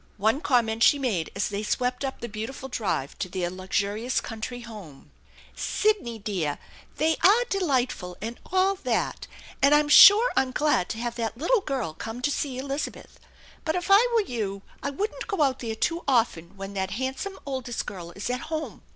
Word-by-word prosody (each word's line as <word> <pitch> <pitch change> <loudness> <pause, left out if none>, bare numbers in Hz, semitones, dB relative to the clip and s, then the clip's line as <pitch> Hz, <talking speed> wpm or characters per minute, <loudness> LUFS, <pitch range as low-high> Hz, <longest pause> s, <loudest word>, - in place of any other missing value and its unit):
One 220 +8 +2
comment 230 -5 +1
she 285 - +6
made 215 - -1
as 195 - 0
they 205 0 -3
swept 250 +4 -1
up 270 -1 -4
the 235 - -4
beautiful 225 +5 -6
drive 200 - -2
to 185 - -3
their 175 -1 -2
luxurious 200 +6 -1
country 235 +2 -6
home: 205 -12 -11 0.2
" - - -23
Sidney 410 - 0
dear, 185 -9 -2 0.4
they 320 +2 +1
are 430 +6 +6
delightful 255 - 0
and 230 +3 -6
all 380 +1 +3
that, - - -2 0.3
and 280 +2 +6
I'm 295 0 +3
sure 420 +10 +9
I'm 260 -1 +1
glad 295 -11 +1
to 225 - -3
have 240 0 -3
that 225 -1 -3
little 395 - +2
girl 260 - -3
come 225 +8 -6
to 290 - +2
see 275 -3 -2
Elizabeth, 275 +2 -5 0.4
but 315 +1 -1
if 360 +2 -2
I 420 +5 +7
were 455 - +5
you 205 - -4 0.2
I 280 - -2
wouldn't 400 +10 -4
go 390 -7 +1
out 265 -2 +1
there 225 -2 -4
too 335 +9 -1
often 210 -9 +1
when 195 +1 -6
that 190 -1 -2
handsome 265 +10 -3
oldest 260 -4 -3
girl 175 -4 -7
is 195 - -5
at 250 - -1
home. 315 -1 -4
245 Hz, 185 wpm, -26 LUFS, 205-295 Hz, 0.4 s, sure